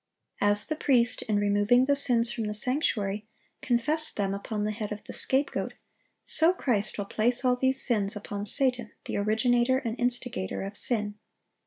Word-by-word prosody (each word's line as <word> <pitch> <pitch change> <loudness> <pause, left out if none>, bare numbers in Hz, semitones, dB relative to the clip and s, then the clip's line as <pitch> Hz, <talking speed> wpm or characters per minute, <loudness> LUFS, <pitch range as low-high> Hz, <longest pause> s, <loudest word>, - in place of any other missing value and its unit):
As 205 0 +3
the 310 - -2
priest, 250 -6 +2
in 210 - +2
removing 205 +5 +3
the 285 +1 +2
sins 240 -4 +2
from 225 -2 -3
the 210 0 -3
sanctuary, 215 -5 -1 0.3
confessed 295 +6 0
them 195 -2 -1
upon 210 +1 -4
the 210 - -1
head 215 -1 -5
of 210 0 -6
the - - -9
scapegoat, 270 +2 +1 0.5
so 325 +3 +4
Christ 215 - -1
will 205 - -3
place 240 +5 0
all 250 0 +4
these 260 +1 +1
sins 210 -5 0
upon 205 0 -4
Satan, 250 -3 +2
the - - -3
originator 240 +5 +2
and 230 -4 -3
instigator 245 -6 -2
of 195 +1 -6
sin. 210 -2 -2
230 Hz, 170 wpm, -27 LUFS, 205-255 Hz, 0.5 s, so